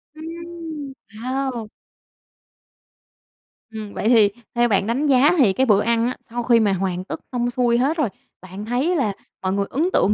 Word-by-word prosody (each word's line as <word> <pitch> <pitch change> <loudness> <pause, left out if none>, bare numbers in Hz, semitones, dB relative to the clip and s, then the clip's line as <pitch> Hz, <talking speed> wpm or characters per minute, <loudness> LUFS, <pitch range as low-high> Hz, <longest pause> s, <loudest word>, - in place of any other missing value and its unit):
Ừm, 325 -3 -7 0.2
hao. 250 0 -3 2.0
Ừm. 215 -2 -7
Vậy 220 - 0
thì 220 -4 +6 0.3
theo 240 0 +4
bạn 200 -2 +1
đánh 260 +6 0
giá 280 +1 +5
thì 225 -9 +5
cái 260 +6 +2
bữa 210 -4 +4
ăn 230 0 +2
á, 250 - -2
sau 240 +1 -3
khi 235 0 +4
mà 205 -3 +2
hoàn 185 -1 -2
tất - - -6
xong 245 -1 0
xuôi 240 -1 +2
hết 280 +7 +1
rồi, 290 -8 +1 0.3
bạn 190 +3 -8
thấy 255 +10 0
là 240 - +1 0.3
mọi 185 0 -1
người 200 0 0
ấn 320 +7 0
tượng 205 - +3
240 Hz, 180 wpm, -22 LUFS, 210-275 Hz, 2.0 s, thì